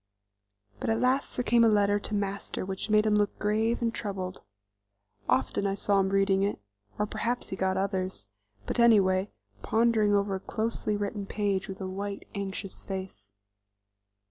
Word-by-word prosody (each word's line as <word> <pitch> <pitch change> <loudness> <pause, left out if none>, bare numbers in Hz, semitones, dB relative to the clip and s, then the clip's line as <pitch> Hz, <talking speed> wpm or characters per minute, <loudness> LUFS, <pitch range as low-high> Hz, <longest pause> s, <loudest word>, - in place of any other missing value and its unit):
But - - -2
at 225 - +2
last 260 +2 +1
there 250 - +1
came 235 -1 +4
a - - +6
letter 205 -1 +3
to 210 - -3
Master 200 -1 -3
which 190 +3 -4
made 215 0 +4
him 215 - +3
look 210 -1 +1
grave 220 +3 +1
and 230 -1 +1
troubled. 190 -4 -4 0.9
Often 130 +10 +1
I 195 - 0
saw 200 0 +2
him 190 0 +2
reading 195 0 +3
it, 200 - 0 0.4
or 210 - +1
perhaps 240 +3 -2
he - - -3
got 190 0 0
others, 190 - -1 0.4
but - - -2
anyway 200 -4 +5 0.3
pondering 220 - +3
over 200 0 +1
a 190 - -2
closely 220 0 -2
written 205 0 -3
page 200 -3 -1
with 190 - -6
a 190 - -3
white, 200 +1 -5
anxious 195 -1 -5
face. 185 - -7
200 Hz, 170 wpm, -29 LUFS, 190-215 Hz, 0.9 s, a